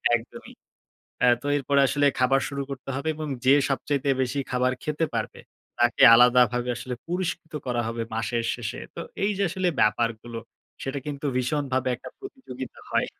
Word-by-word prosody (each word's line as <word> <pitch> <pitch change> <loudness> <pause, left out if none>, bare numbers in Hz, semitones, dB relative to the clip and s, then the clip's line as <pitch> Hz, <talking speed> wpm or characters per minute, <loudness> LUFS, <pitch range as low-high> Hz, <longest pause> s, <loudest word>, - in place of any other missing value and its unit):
একদমই। 115 0 -8 0.7
অ্যা 125 - +6
তো - - -5
এরপরে 140 +1 +2
আসলে 145 +2 +1
খাবার 130 +1 +3
শুরু 140 -1 -4
করতে 135 0 -7
হবে 140 +4 -2
এবং 155 0 -5 0.2
যে 130 - +7 0.2
সবচাইতে 140 +1 -1
বেশি 130 +2 -1
খাবার 125 0 +2
খেতে 150 +2 0
পারবে, 115 -2 -3 0.4
তাকে 120 0 +2
আলাদাভাবে 125 0 +5
আসলে 125 +1 -5
পুরস্কৃত 170 -2 -3
করা 120 -1 0
হবে 115 0 -3
মাসের 115 +1 -1
শেষে। 120 -1 -5 0.2
তো - - -6 0.2
এইযে 200 -1 +1
আসলে 185 +1 -1
ব্যাপারগুলো, 115 +1 0 0.4
সেটা 135 +1 -3
কিন্তু 145 -1 -5
ভীষণভাবে 130 0 -1
একটা 120 - -10
প্রতিযোগিতা 260 - -9
হয়। - - +2
130 Hz, 155 wpm, -25 LUFS, 120-145 Hz, 0.7 s, যে